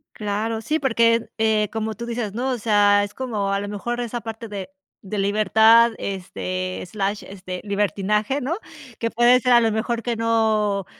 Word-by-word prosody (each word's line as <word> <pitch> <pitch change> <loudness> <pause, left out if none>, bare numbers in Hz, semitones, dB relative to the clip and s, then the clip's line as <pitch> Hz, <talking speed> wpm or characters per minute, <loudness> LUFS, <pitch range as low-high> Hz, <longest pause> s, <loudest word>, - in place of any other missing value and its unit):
Claro, 215 +2 -2
sí, 305 +8 0
porque, 230 -4 +2
eh, 215 -2 +2
como 220 -1 -3
tú 235 - -6
dices, 230 -4 -3
¿no?, 260 +2 -1
o 250 - -1
sea, 205 -2 +4
es 205 - -7
como 215 -7 -2
a 200 - +1
lo 205 - -5
mejor 240 +4 -4
esa 240 0 -3
parte 225 0 -7
de 200 -3 -6 0.4
de 205 +2 -4
libertad, 220 +3 +5
este, 185 -1 -4
slash, 200 +2 -3
este, 185 -2 -7
libertinaje, 210 - 0
¿no?, 290 +6 -2 0.4
que 230 - -1
puede 240 +1 +5
ser 250 0 +1
a 240 - +8
lo 225 -1 +2
mejor 230 +2 -1
que 240 -1 -1
no 220 -3 +1
220 Hz, 180 wpm, -22 LUFS, 205-235 Hz, 0.4 s, a